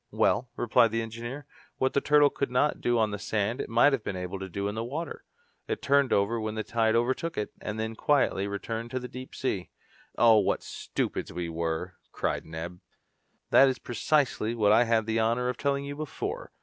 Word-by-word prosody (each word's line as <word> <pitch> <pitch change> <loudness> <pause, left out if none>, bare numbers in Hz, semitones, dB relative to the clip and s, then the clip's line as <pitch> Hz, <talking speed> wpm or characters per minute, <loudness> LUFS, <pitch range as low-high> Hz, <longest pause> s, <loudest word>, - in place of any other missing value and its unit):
"Well," 125 +4 +1
replied 115 0 +4
the 115 +1 -1
engineer, 120 +5 -7 0.3
"what 130 - +1
the 140 - +2
turtle 145 -1 +5
could 140 - -2
not 125 +4 +1
do 120 0 +2
on 110 -2 +2
the 105 - -4
sand 105 +3 -1
it - - -6
might 120 +5 +5
have 130 -5 -1
been 95 - -3
able 90 +1 -4
to 95 0 -6
do 100 +3 -3
in 105 - -2
the 110 +1 -3
water. 150 +8 -5 0.4
It - - -2
turned 140 -2 +3
over 110 +3 +2
when 110 0 -3
the 110 - -2
tide 110 +1 +1
overtook 130 +8 0
it, 105 - -2
and 105 +1 -4
then 110 0 -2
quietly 120 -8 +2
returned 115 +3 -4
to 130 +1 -2
the 125 - -6
deep 130 +1 -9
sea." 95 -8 -2 0.5
"Oh! 115 -2 +6
what - - 0
stupids - - -3
we 85 0 -4
were!" 85 +2 -3
cried - - -2
Neb. 80 +2 -6 0.7
"That 135 - +7
is 130 - -2
precisely 120 -2 0
what 105 -3 +3
I 115 +3 +6
had 115 -2 +2
the 110 0 0
honour 120 +3 +1
of 125 - -3
telling 140 0 0
you 140 0 -5
before!" 155 -1 -5
115 Hz, 210 wpm, -28 LUFS, 105-130 Hz, 0.7 s, That